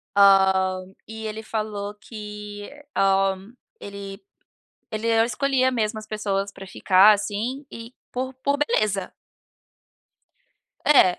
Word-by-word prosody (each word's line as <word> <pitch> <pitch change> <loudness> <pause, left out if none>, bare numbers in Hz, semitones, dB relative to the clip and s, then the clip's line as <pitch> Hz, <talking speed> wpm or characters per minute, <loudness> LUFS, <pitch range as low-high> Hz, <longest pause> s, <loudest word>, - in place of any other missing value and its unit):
Ah, 190 -1 +5 0.3
e 220 0 -6
ele 215 0 -5
falou 210 -2 -4
que, 210 -1 -9 0.3
hã, 195 0 +2 0.3
ele 200 0 -8 0.7
ele 225 +1 0
não 225 - +5
escolhia 260 +1 +1
mesmo 220 -3 -1
as 215 - -9
pessoas 200 -2 -2
pra 195 - -10
ficar, 190 +2 +5
assim, 215 +7 -3
e 230 +2 -10 0.2
por 260 +1 -4
por 280 +2 -1
beleza. 210 -9 0 1.7
É, 185 -12 +6
210 Hz, 115 wpm, -24 LUFS, 195-225 Hz, 1.7 s, É